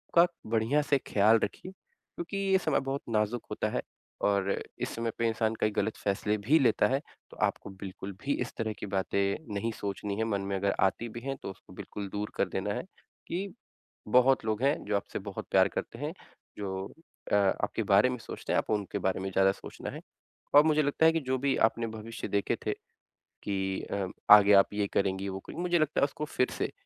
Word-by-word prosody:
का 170 +1 +8 0.2
बढ़िया 115 +6 +2
से 140 - +6
ख्याल 110 +2 +5
रखिए। 180 - -4
क्योंकि 190 0 -9
ये 195 -1 +3
समय 155 -5 +1
बहुत 135 +1 -3
नाज़ुक 110 +1 0
होता - - -1
है - - -1 0.4
और 100 -1 +2 0.3
इस - - -2
समय 115 0 -1
पे 115 - +1
इंसान 110 0 0
कई 110 - +3
गलत 105 +1 -1
फैसले 105 +1 0
भी 135 +11 +3
लेता 130 - +4
है 135 +2 0 0.3
तो - - -13
आपको - - -3
बिल्कुल 95 0 -7
भी 140 - 0
इस 125 - -3
तरह 110 -2 -1
की - - -4
बातें 100 +5 -1
नहीं 115 +3 -1
सोचनी 100 0 -3
है 110 - +1
मन 100 -3 -1
में - - 0
अगर 100 +1 0
आती 115 +5 +1
भी - - -3
हैं 135 +2 -3
तो - - -4
उसको 95 - -16
बिल्कुल 100 -1 -6
दूर 105 +1 -4
कर - - +1
देना 100 +2 -2
है - - -3 0.4
कि 185 +4 -2 0.7
बहुत 130 -1 +4
लोग 110 0 -1
हैं 140 +2 +4
जो 105 +1 0
आपसे 100 - -5
बहुत 100 - -5
प्यार 95 0 +6
करते 115 - -5
हैं। 150 +2 -3 0.4
जो 95 -1 -4 0.4
अ, - - +7
आपके 100 +2 +1
बारे 100 +5 +6
में 125 - -2
सोचते 115 - -5
हैं - - +3
आप - - -4
उनके 105 -3 -1
बारे 95 0 0
में 95 - -2
ज़्यादा 95 +1 +4
सोचना - - -8
है। - - -7 0.6
और 145 - +10
मुझे 155 -1 +4
लगता 145 +3 +2
है 160 - +8
कि 165 - +2
जो 130 - +2
भी 140 -1 +3
आपने 115 0 -4
भविष्य 110 +1 -6
देखे 100 -1 +1
थे - - +1 0.7
कि 95 -1 -1
अ, 100 -2 -1 0.3
आगे 105 -1 +8
आप 100 +1 +6
ये 105 -1 0
करेंगी 95 0 0
वो 95 0 -4
करेंगी। 160 - -7
मुझे 175 -1 +2
लगता 155 -1 +1
है - - +6
उसको 150 +2 -4
फिर 125 -4 0
से - - -1
110 Hz, 215 wpm, -30 LUFS, 100-135 Hz, 0.7 s, और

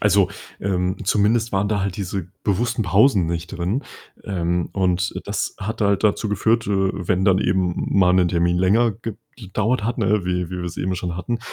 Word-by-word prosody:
also, 100 -3 +4 0.3
ähm, 90 -1 -1
zumindest 110 +4 +2
waren 95 +1 +1
da 105 -2 0
halt 95 -2 -2
diese 95 -2 -3 0.2
bewussten 115 +3 0
Pausen 100 0 +4
nicht 85 +1 -3
drin. 95 +8 -2 0.4
Ähm, 85 -2 -1
und 90 -2 0
das - - -2
hat 110 +2 -3
halt 100 0 +2
dazu 105 0 +1
geführt, 115 +3 +1
äh, - - -2 0.4
wenn 95 +1 +1
dann 95 -1 +5
eben 95 -3 0
mal 90 -2 +5
'nen 90 -2 +4
Termin 85 0 +1
länger 105 +4 +3 0.4
gedauert 105 +2 -1
hat, 120 +3 -2
ne, 105 -3 +1
wie 90 -1 -1
wie 90 -1 -4
wir's 90 -1 -5
eben 95 0 -1
schon 85 -1 -3
hatten, 115 +7 -3
95 Hz, 180 wpm, -22 LUFS, 90-105 Hz, 0.4 s, dann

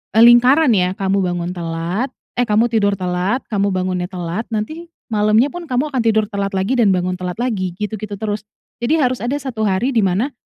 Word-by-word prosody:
eee, 225 - +7
lingkaran, 250 +5 +6
ya, 180 -1 +1
kamu 195 0 0
bangun 175 -1 -2
telat, 170 +7 -2 0.3
eh, 245 - +2
kamu 215 +3 +3
tidur 205 -3 +2
telat, 180 +7 -1
kamu 200 -1 +1
bangunnya 185 -1 -1
telat. 180 +3 -4
Nanti, 310 +11 -4 0.2
malamnya 215 +4 +3
pun 350 0 -7
kamu 260 +3 -1
akan 260 -3 0
tidur 220 -1 +3
telat 200 -1 -2
lagi, 190 +7 0
dan 205 -5 +4
bangun 180 0 -1
telat 180 -1 -4
lagi, 190 -8 -1
gitu-gitu 210 0 -4
terus. 210 -2 -3 0.4
Jadi, 240 +7 +1
harus 255 -2 +1
ada 250 +4 -1
1 255 -6 -4
hari, 200 +7 +1
dimana, 220 +2 +1
210 Hz, 190 wpm, -18 LUFS, 185-240 Hz, 0.4 s, eee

